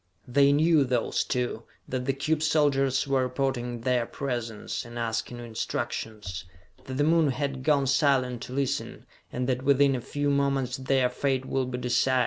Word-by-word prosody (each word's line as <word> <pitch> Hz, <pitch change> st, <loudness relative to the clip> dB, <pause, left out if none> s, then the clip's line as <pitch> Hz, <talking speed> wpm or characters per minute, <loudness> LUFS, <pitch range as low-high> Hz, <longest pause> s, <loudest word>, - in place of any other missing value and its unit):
They 140 Hz, +3 st, +4 dB
knew, 155 Hz, +1 st, +4 dB
those 125 Hz, -3 st, 0 dB
two, 125 Hz, -3 st, -2 dB, 0.3 s
that 125 Hz, -1 st, -3 dB
the 135 Hz, -, +1 dB
cube 150 Hz, +3 st, -1 dB
soldiers 140 Hz, -4 st, +2 dB
were 135 Hz, -2 st, +1 dB
reporting 125 Hz, -2 st, -2 dB
their 125 Hz, -1 st, +1 dB
presence, 120 Hz, -6 st, -4 dB
and 120 Hz, 0 st, -10 dB
asking 115 Hz, +1 st, -2 dB
instructions; 110 Hz, -4 st, -4 dB, 0.4 s
that 130 Hz, -, -5 dB
the 145 Hz, -, +2 dB
Moon 160 Hz, -1 st, +4 dB
had 135 Hz, 0 st, -2 dB
gone 140 Hz, 0 st, +2 dB
silent 130 Hz, -3 st, +2 dB
to 125 Hz, -, -7 dB
listen, 135 Hz, -1 st, -2 dB, 0.3 s
and 125 Hz, 0 st, -2 dB
that 130 Hz, -1 st, 0 dB
within 140 Hz, 0 st, +4 dB
a 125 Hz, -, -3 dB
few 145 Hz, +3 st, -1 dB
moments 140 Hz, -2 st, 0 dB
their 130 Hz, -1 st, +2 dB
fate 130 Hz, +1 st, -1 dB
would 130 Hz, -1 st, -1 dB
be 125 Hz, -, -3 dB
decided. 125 Hz, +1 st, +2 dB
130 Hz, 165 wpm, -27 LUFS, 125-140 Hz, 0.4 s, They